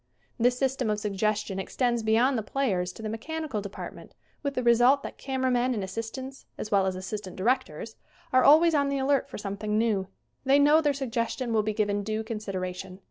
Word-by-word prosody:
This 245 Hz, +1 st, +3 dB
system 265 Hz, -3 st, 0 dB
of 210 Hz, 0 st, 0 dB
suggestion 210 Hz, -1 st, -1 dB
extends 240 Hz, +4 st, 0 dB
beyond 230 Hz, +5 st, +3 dB
the 225 Hz, -, 0 dB
players 200 Hz, -6 st, -1 dB
to 225 Hz, -, -10 dB
the -, -, -2 dB
mechanical 260 Hz, +2 st, -4 dB
department 200 Hz, 0 st, -9 dB, 0.3 s
with 280 Hz, -2 st, -3 dB
the 255 Hz, -, -1 dB
result 245 Hz, +4 st, +5 dB
that -, -, -8 dB
camera 260 Hz, -1 st, -1 dB
men 250 Hz, 0 st, +1 dB
and 205 Hz, -, -2 dB
assistants, 230 Hz, +7 st, -6 dB
as 210 Hz, -, -6 dB
well 195 Hz, -2 st, +3 dB
as 190 Hz, -, -1 dB
assistant 185 Hz, 0 st, -6 dB
directors, 225 Hz, -2 st, -1 dB, 0.4 s
are 255 Hz, 0 st, +5 dB
always 320 Hz, +3 st, +7 dB
on 285 Hz, -2 st, +2 dB
the 280 Hz, -, 0 dB
alert 275 Hz, 0 st, +1 dB
for -, -, -7 dB
something 210 Hz, +1 st, -3 dB
new. 215 Hz, -4 st, +1 dB, 0.4 s
They 270 Hz, +1 st, +4 dB
know 295 Hz, +2 st, +5 dB
their 295 Hz, -2 st, +2 dB
suggestion 245 Hz, -2 st, -2 dB
will 220 Hz, -, +3 dB
be 215 Hz, 0 st, -2 dB
given 205 Hz, -1 st, 0 dB
due 215 Hz, +2 st, -2 dB
consideration. 190 Hz, -4 st, -5 dB
225 Hz, 190 wpm, -27 LUFS, 205-265 Hz, 0.4 s, always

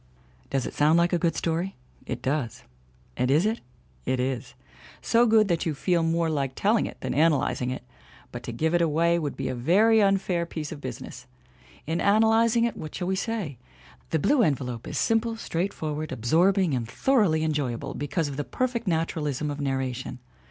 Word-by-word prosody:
Does 135 Hz, -2 st, -1 dB
it -, -, -5 dB
sound 155 Hz, +3 st, +4 dB
like 170 Hz, +1 st, +2 dB
a 175 Hz, -, +2 dB
good 165 Hz, -1 st, +1 dB
story? 170 Hz, +3 st, -1 dB, 0.3 s
It -, -, -4 dB
does. 130 Hz, -5 st, -2 dB, 0.5 s
And 125 Hz, -, 0 dB
is 155 Hz, +7 st, +4 dB
it? 225 Hz, +2 st, -1 dB, 0.4 s
It 130 Hz, -, -1 dB
is. 130 Hz, -1 st, -3 dB, 0.4 s
So 235 Hz, +1 st, +3 dB
good 220 Hz, -2 st, +5 dB
that 170 Hz, -2 st, 0 dB
you 155 Hz, -, -1 dB
feel 175 Hz, +4 st, +1 dB
much 165 Hz, 0 st, +1 dB
more 165 Hz, 0 st, +1 dB
like 140 Hz, -4 st, -1 dB
telling 215 Hz, +3 st, +2 dB
it -, -, -10 dB
than -, -, -2 dB
analyzing 145 Hz, -4 st, +2 dB
it. 130 Hz, -1 st, -5 dB, 0.5 s
But 120 Hz, -, -6 dB
to -, -, -4 dB
"give 160 Hz, +8 st, 0 dB
it 175 Hz, -, +3 dB
away" 170 Hz, +1 st, +2 dB
would 150 Hz, -3 st, -4 dB
be -, -, -2 dB
a 130 Hz, -, -2 dB
very 205 Hz, -, +4 dB
unfair 190 Hz, -4 st, +1 dB
piece 155 Hz, -3 st, -5 dB
of 145 Hz, -, -7 dB
business. 130 Hz, -4 st, -8 dB, 0.6 s
In 160 Hz, +3 st, -1 dB
analyzing 225 Hz, +3 st, +4 dB
it 235 Hz, -, 0 dB
what 155 Hz, -, -7 dB
shall 180 Hz, -1 st, -3 dB
we 190 Hz, -, +1 dB
say? 195 Hz, -, -3 dB, 0.5 s
The -, -, +1 dB
Blue 265 Hz, -, +3 dB
Envelope 130 Hz, -, -1 dB
is -, -, -4 dB
simple, 225 Hz, 0 st, +1 dB
straightforward, 155 Hz, -6 st, -3 dB
absorbing 170 Hz, -, +2 dB
and 120 Hz, -3 st, -2 dB
thoroughly 190 Hz, -, +2 dB
enjoyable 145 Hz, -7 st, -2 dB
because 145 Hz, +3 st, -2 dB
of 140 Hz, -1 st, -6 dB
the 145 Hz, -, -1 dB
perfect 240 Hz, -, -2 dB
naturalism 155 Hz, -4 st, -1 dB
of 145 Hz, 0 st, -5 dB
narration. 130 Hz, -2 st, -2 dB
160 Hz, 185 wpm, -26 LUFS, 140-195 Hz, 0.6 s, good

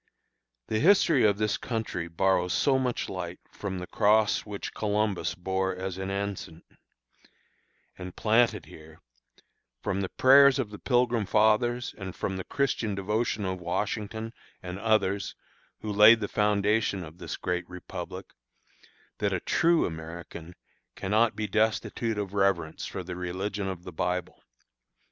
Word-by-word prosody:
The 110 Hz, -, -1 dB
history 165 Hz, -, +5 dB
of 100 Hz, -1 st, +3 dB
this 105 Hz, -1 st, 0 dB
country 110 Hz, -8 st, -3 dB
borrows 90 Hz, +1 st, +1 dB
so 135 Hz, -2 st, +3 dB
much 125 Hz, -2 st, -1 dB
light 90 Hz, -1 st, -5 dB
from 95 Hz, -2 st, -5 dB
the 90 Hz, -, -5 dB
cross 105 Hz, +2 st, +2 dB
which 100 Hz, -1 st, -6 dB
Columbus 105 Hz, -4 st, -1 dB
bore 95 Hz, +1 st, -1 dB
as 95 Hz, 0 st, -5 dB
an 95 Hz, 0 st, -3 dB
ensign, 100 Hz, -4 st, -4 dB, 1.4 s
and 90 Hz, -1 st, -7 dB
planted 115 Hz, +2 st, +2 dB
here, 80 Hz, 0 st, -14 dB, 0.8 s
from 95 Hz, +1 st, -1 dB
the 95 Hz, -, -2 dB
prayers 140 Hz, +1 st, +6 dB
of 120 Hz, -6 st, -2 dB
the 105 Hz, -, -9 dB
Pilgrim 120 Hz, -4 st, +1 dB
Fathers, 120 Hz, +3 st, +2 dB
and 95 Hz, -3 st, -7 dB
from 95 Hz, -1 st, -3 dB
the 95 Hz, -, -4 dB
Christian 120 Hz, -6 st, -1 dB
devotion 105 Hz, +2 st, -1 dB
of 95 Hz, -1 st, -3 dB
Washington 105 Hz, +5 st, -3 dB, 0.3 s
and 90 Hz, +1 st, -6 dB
others 100 Hz, -3 st, +1 dB, 0.5 s
who 105 Hz, -, -4 dB
laid 105 Hz, +3 st, +8 dB
the 105 Hz, -, -2 dB
foundation 105 Hz, -1 st, +1 dB
of 80 Hz, +1 st, -12 dB
this -, -, -5 dB
great 90 Hz, 0 st, -3 dB
Republic, 90 Hz, 0 st, -8 dB, 0.9 s
that -, -, +1 dB
a -, -, 0 dB
true 170 Hz, 0 st, +2 dB
American 85 Hz, +1 st, -8 dB, 0.4 s
cannot 110 Hz, +4 st, +1 dB
be 110 Hz, -, -2 dB
destitute 110 Hz, +2 st, 0 dB
of 100 Hz, -2 st, -3 dB
reverence 95 Hz, -5 st, 0 dB
for -, -, -5 dB
the 90 Hz, +1 st, -6 dB
religion 95 Hz, +3 st, -3 dB
of 95 Hz, -2 st, -5 dB
the 90 Hz, -, -9 dB
Bible. 90 Hz, +3 st, -3 dB
100 Hz, 145 wpm, -28 LUFS, 90-110 Hz, 1.4 s, laid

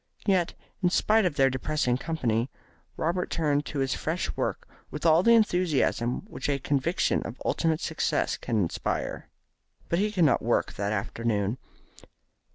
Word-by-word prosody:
Yet, 185 Hz, -4 st, +2 dB, 0.3 s
in 180 Hz, -, +3 dB
spite 215 Hz, +3 st, +3 dB
of 170 Hz, -5 st, 0 dB
their 135 Hz, -1 st, +4 dB
depressing 130 Hz, -1 st, 0 dB
company, 125 Hz, -5 st, -1 dB, 0.5 s
Robert 175 Hz, +3 st, -1 dB
turned 145 Hz, -3 st, 0 dB
to 150 Hz, -, -5 dB
his 135 Hz, -2 st, +1 dB
fresh -, -, -2 dB
work -, -, -2 dB, 0.2 s
with 150 Hz, +3 st, -6 dB
all 165 Hz, +1 st, +6 dB
the 235 Hz, +4 st, +6 dB
enthusiasm 175 Hz, -, +1 dB
which 210 Hz, -, -5 dB
a 140 Hz, -, +2 dB
conviction 140 Hz, +5 st, 0 dB
of 115 Hz, -, -7 dB
ultimate 160 Hz, -2 st, +1 dB
success -, -, 0 dB
can 115 Hz, -, -2 dB
inspire. 90 Hz, -5 st, -2 dB, 0.6 s
But 170 Hz, -, +1 dB
he 210 Hz, +1 st, +1 dB
could 180 Hz, -5 st, +3 dB
not 135 Hz, -, +3 dB
work 120 Hz, -, 0 dB
that 100 Hz, +1 st, -2 dB
afternoon. 110 Hz, +1 st, -1 dB
145 Hz, 155 wpm, -27 LUFS, 120-175 Hz, 0.6 s, all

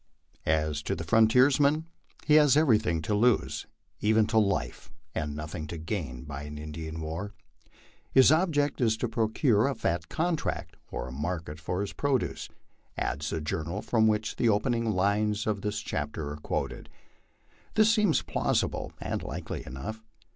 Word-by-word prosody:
As 75 Hz, -1 st, +1 dB
to -, -, -2 dB
the 85 Hz, -, -5 dB
frontiersman, 130 Hz, -, +4 dB, 0.4 s
he 150 Hz, -, +3 dB
has 150 Hz, -2 st, +6 dB
everything 110 Hz, -, +3 dB
to 105 Hz, -, -1 dB
lose, 115 Hz, +2 st, +2 dB, 0.3 s
even 110 Hz, +1 st, +3 dB
to 110 Hz, +1 st, +3 dB
life, 100 Hz, -2 st, -1 dB, 0.2 s
and 75 Hz, -2 st, -3 dB
nothing 75 Hz, +1 st, -5 dB
to 85 Hz, -, -6 dB
gain 80 Hz, -, -4 dB
by 70 Hz, -1 st, -6 dB
an 75 Hz, 0 st, -7 dB
Indian 80 Hz, +1 st, -6 dB
war. 85 Hz, +7 st, -5 dB, 0.4 s
" -, -, -30 dB
His 130 Hz, +1 st, +8 dB
object 155 Hz, -4 st, +2 dB
is 110 Hz, -2 st, +3 dB
to 120 Hz, -, -1 dB
procure 110 Hz, +1 st, +2 dB
a 140 Hz, -, -1 dB
fat 85 Hz, -6 st, -2 dB
contract 165 Hz, -1 st, -2 dB
or -, -, -4 dB
a -, -, -7 dB
market 75 Hz, +2 st, -4 dB
for 90 Hz, +4 st, -2 dB
his 100 Hz, -, -4 dB
produce," 140 Hz, -3 st, -1 dB, 0.5 s
adds 75 Hz, +1 st, -2 dB
the 80 Hz, -, -2 dB
journal 80 Hz, +5 st, -3 dB
from 110 Hz, -2 st, +3 dB
which 110 Hz, 0 st, 0 dB
the 120 Hz, -, +3 dB
opening 115 Hz, +2 st, +1 dB
lines 105 Hz, +2 st, +1 dB
of 105 Hz, -2 st, -1 dB
this 105 Hz, +1 st, -2 dB
chapter 75 Hz, 0 st, -3 dB
are 75 Hz, -, -6 dB
quoted. 75 Hz, -, -4 dB, 0.9 s
This 215 Hz, 0 st, +5 dB
seems 210 Hz, -, +3 dB
plausible 80 Hz, -1 st, -1 dB
and -, -, -3 dB
likely -, -, -5 dB
enough. 105 Hz, -, -6 dB
105 Hz, 160 wpm, -28 LUFS, 80-120 Hz, 0.9 s, His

